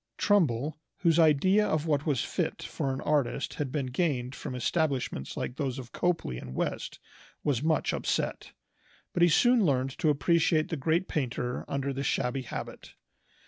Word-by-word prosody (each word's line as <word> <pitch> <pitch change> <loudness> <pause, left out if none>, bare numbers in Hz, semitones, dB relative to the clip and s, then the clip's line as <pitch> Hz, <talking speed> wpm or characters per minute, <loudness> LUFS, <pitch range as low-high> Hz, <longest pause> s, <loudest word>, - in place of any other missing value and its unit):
Trumbull, 155 - +2 0.2
whose 170 -2 +4
idea 165 +6 +5
of 155 0 0
what 150 -1 0
was 140 -6 +1
fit - - -2
for 135 - -2
an 130 - -4
artist 140 -3 0
had 135 -3 -2
been 145 -2 -1
gained 130 -2 -1
from 130 - -6
establishments 130 - -1
like 125 - -4
those 135 -4 -2
of 125 -2 -8
Copley 170 - -1
and 65 - -8
West - - -3 0.5
was 135 -5 +1
much 155 +1 +1
upset. - - -2 0.6
But 175 - 0
he 175 - +7
soon 240 +7 +5
learned 135 -5 +1
to 160 -2 +3
appreciate 155 +2 +2
the - - -1
great 160 +6 0
painter 125 -4 -2
under 140 0 -2
the 135 - -3
shabby 130 0 0
habit. 120 - -7
145 Hz, 165 wpm, -29 LUFS, 130-165 Hz, 0.6 s, he